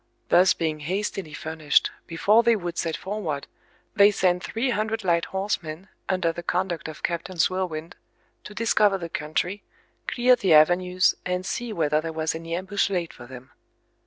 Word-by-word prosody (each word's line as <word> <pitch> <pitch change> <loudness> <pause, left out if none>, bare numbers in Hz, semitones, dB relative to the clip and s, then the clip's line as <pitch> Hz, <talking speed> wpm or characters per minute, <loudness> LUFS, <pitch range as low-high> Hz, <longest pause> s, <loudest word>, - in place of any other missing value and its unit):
Thus 180 +1 +5
being 155 -2 -2
hastily 185 +1 -3
furnished, 155 -2 +1 0.2
before 205 +7 +3
they 235 -1 +4
would 175 -4 -4
set 165 -2 -2
forward, 185 -8 -4 0.5
they 200 -1 +7
sent 180 -3 +1
three 245 +3 -1
hundred 220 0 -1
light 170 -2 +2
horsemen, 190 -3 -4 0.2
under 185 -3 +1
the 175 - -7
conduct 175 -1 -2
of 155 - -9
Captain 170 +2 -3
Swillwind, 170 -2 -1 0.5
to 210 - -10
discover 210 -2 +3
the 170 -2 -6
country, 170 +6 -2 0.5
clear 250 +1 +4
the 190 -9 +3
avenues, 180 +4 +4
and 180 0 -2
see 230 +5 -3
whether 155 -5 +1
there 165 0 -4
was 160 0 -1
any 165 +1 -5
ambush 190 +3 -1
laid 175 -4 -2
for 120 - -12
them. 130 +1 -12
180 Hz, 160 wpm, -25 LUFS, 160-200 Hz, 0.5 s, they